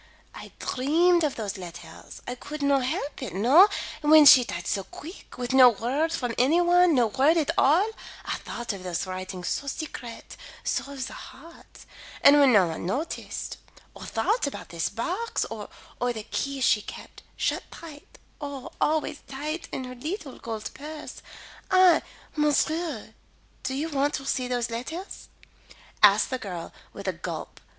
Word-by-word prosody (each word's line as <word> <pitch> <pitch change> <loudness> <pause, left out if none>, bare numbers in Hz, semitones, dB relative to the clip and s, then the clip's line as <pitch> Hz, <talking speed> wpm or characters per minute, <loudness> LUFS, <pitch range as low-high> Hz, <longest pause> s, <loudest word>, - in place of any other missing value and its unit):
I - - -10
dreamed 335 +6 +2
of 295 -3 0
those 205 -3 -4
letters 175 -2 -10
I 245 - -2
could 290 +4 -7
not 280 -2 +3
help 290 0 -3
it, 210 -10 -5
no; 270 - +7 0.3
and 295 - -1
when 310 -1 +9
she 260 -2 +10
died 170 -6 -6
so 195 - -1
quick 320 - -12
with 245 +1 -3
no 260 -2 +9
word 260 +8 -1
for 245 -7 -2
any 285 +8 +4
one, 350 -1 +5
no 245 -2 +4
word 275 +9 +3
at 310 -3 +1
all, 330 +10 +4 0.4
I - - -2
thought 235 -2 -5
of 195 - -8
those 180 -1 -3
writings 185 -1 -5
so 280 - -2
secret, 255 -5 -7 0.3
so 280 - -2
of 265 -2 -4
the - - -8
heart, 330 +6 -13 0.4
and 285 +1 +8
when 275 -2 +6
no 200 -5 +6
one 160 -1 -5
noticed 255 - -4 0.4
or - - -10
thought 440 -6 0
about 280 - -7
this 165 -1 -2
box, 370 - -2
or - - -6 0.3
or 245 0 +1
the 220 -3 -6
key 275 +4 -3
she 235 -4 +4
kept - - -11 0.2
shut - - 0
tight, 305 -3 -12 0.2
oh, 285 -3 -6
always 305 -1 0
tight 305 +5 -5
in 260 - -4
her 255 0 -7
leetle 295 - -6
gold 220 -2 -5
purse, 300 +2 -9 0.5
I 370 -3 +6 0.3
Monsieur, 300 -5 0 0.5
do 260 0 -3
you 295 +4 -2
want 290 -1 0
to 270 - -6
see 255 -2 -1
those 245 -1 -1
letters?" 320 - -6 0.7
asked - - +6
the 255 - -2
girl, 180 -6 -7 0.2
with 200 -1 -9
a 190 - 0
gulp. 170 -1 -7
270 Hz, 170 wpm, -26 LUFS, 230-310 Hz, 0.7 s, she